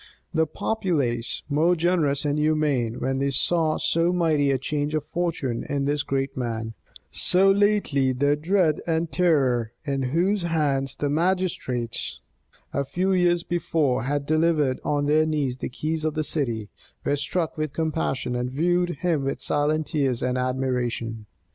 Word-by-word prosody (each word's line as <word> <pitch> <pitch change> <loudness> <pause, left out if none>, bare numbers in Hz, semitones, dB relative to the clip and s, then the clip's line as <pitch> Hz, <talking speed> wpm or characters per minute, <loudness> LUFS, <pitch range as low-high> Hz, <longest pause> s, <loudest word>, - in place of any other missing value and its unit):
The 160 0 +2
populace, 145 - -1
more 155 +5 +3
generous 160 -5 +1
and 145 +1 0
humane, 150 -7 +1
when 135 0 -1
they 140 0 +1
saw 155 +3 +2
so 170 +1 +2
mighty 160 -5 +2
a 135 - +2
change 145 +3 -2
of 155 - -1
fortune 155 -8 -2
in 140 -1 0
this 145 +1 +1
great 135 -1 -2
man, 115 -3 -3 0.4
so 185 - +4
lately 200 -10 +2
their 145 +3 +2
dread 165 0 +1
and 165 0 0
terror, 130 -10 +2
into 135 -3 -1
whose 180 +8 +1
hands 145 -5 0
the 145 - -2
magistrates, 155 -7 -1 0.5
a 140 - 0
few 185 +7 0
years 175 -2 +2
before, 155 -7 0
had 145 +1 -1
delivered 155 -3 +2
on 145 -1 0
their 155 +2 +3
knees 145 -5 -1
the - - -4
keys 155 +5 -3
of 155 0 -1
the 155 - 0
city, 120 -9 -2 0.4
were 145 - +2
struck 160 +3 -1
with 155 -2 -2
compassion, 155 -5 -1
and 125 +1 -1
viewed 175 +6 +1
him 160 -6 +1
with 135 - -2
silent 150 +1 +1
tears 135 -5 -1
and 125 0 0
admiration. 125 -3 -2
150 Hz, 155 wpm, -25 LUFS, 130-165 Hz, 0.5 s, so